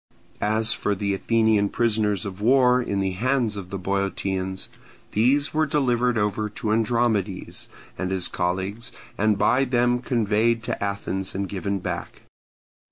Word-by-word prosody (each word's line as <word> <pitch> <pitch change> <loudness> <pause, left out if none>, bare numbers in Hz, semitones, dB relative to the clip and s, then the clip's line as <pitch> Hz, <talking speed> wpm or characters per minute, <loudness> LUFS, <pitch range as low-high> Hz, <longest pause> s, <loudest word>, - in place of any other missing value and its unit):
As 110 +1 +2
for 100 - -1
the 100 0 -1
Athenian 110 0 +2
prisoners 105 -4 0
of 100 0 -6
war 125 +1 +4
in 100 -5 -1
the 95 -1 0
hands 120 +2 0
of 95 -3 -7
the 100 - -4
Boeotians, 95 0 -2 0.4
these 135 +7 +2
were 155 0 +2
delivered 125 -5 +1
over 105 0 0
to 105 +1 -3
Andromedes 110 -4 0 0.3
and 95 - -1
his 95 -2 -1
colleagues, 95 +5 -3 0.2
and 105 0 +2
by 130 +6 +3
them 125 -1 +2
conveyed 115 -1 +1
to 110 - -3
Athens 95 -2 -3
and 100 0 -2
given 100 +1 -2
back. 90 - -5
105 Hz, 145 wpm, -24 LUFS, 100-120 Hz, 0.4 s, war